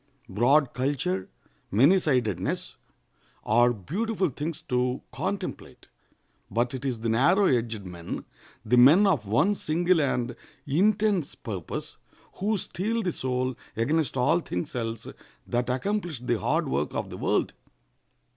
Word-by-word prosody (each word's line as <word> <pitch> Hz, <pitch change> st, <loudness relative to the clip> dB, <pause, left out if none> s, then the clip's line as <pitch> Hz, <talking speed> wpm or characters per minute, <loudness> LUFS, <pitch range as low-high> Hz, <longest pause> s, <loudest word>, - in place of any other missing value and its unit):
Broad 125 Hz, +7 st, +3 dB
culture, 125 Hz, -8 st, -1 dB, 0.4 s
many 140 Hz, -, +5 dB
sidedness, 105 Hz, -, -1 dB, 0.7 s
are 120 Hz, +3 st, +4 dB
beautiful 190 Hz, -, -1 dB
things 150 Hz, +4 st, -4 dB
to 125 Hz, 0 st, -1 dB
contemplate; -, -, -5 dB, 0.6 s
but 120 Hz, +2 st, 0 dB
it 130 Hz, -, -5 dB
is 125 Hz, -5 st, -2 dB
the 115 Hz, -, -1 dB
narrow 170 Hz, -, +4 dB
edged 115 Hz, -, 0 dB
men—the 90 Hz, +7 st, -5 dB
men 150 Hz, +12 st, +7 dB
of 150 Hz, -, +1 dB
one 120 Hz, -, +3 dB
single 175 Hz, -1 st, +1 dB
and 125 Hz, -3 st, -1 dB, 0.3 s
intense 195 Hz, +3 st, +1 dB
purpose—who 125 Hz, -, -5 dB
steel 220 Hz, +5 st, -2 dB
the 180 Hz, -, 0 dB
soul 130 Hz, -2 st, -2 dB, 0.2 s
against 145 Hz, +3 st, +1 dB
all 140 Hz, +7 st, +3 dB
things 90 Hz, -, -5 dB
else, 115 Hz, -2 st, -3 dB, 0.4 s
that 120 Hz, +1 st, -1 dB
accomplish 175 Hz, -, -2 dB
the 120 Hz, -2 st, -1 dB
hard -, -, 0 dB
work 70 Hz, +3 st, -1 dB
of -, -, -3 dB
the -, -, -6 dB
world. -, -, 0 dB
130 Hz, 125 wpm, -27 LUFS, 115-175 Hz, 0.7 s, men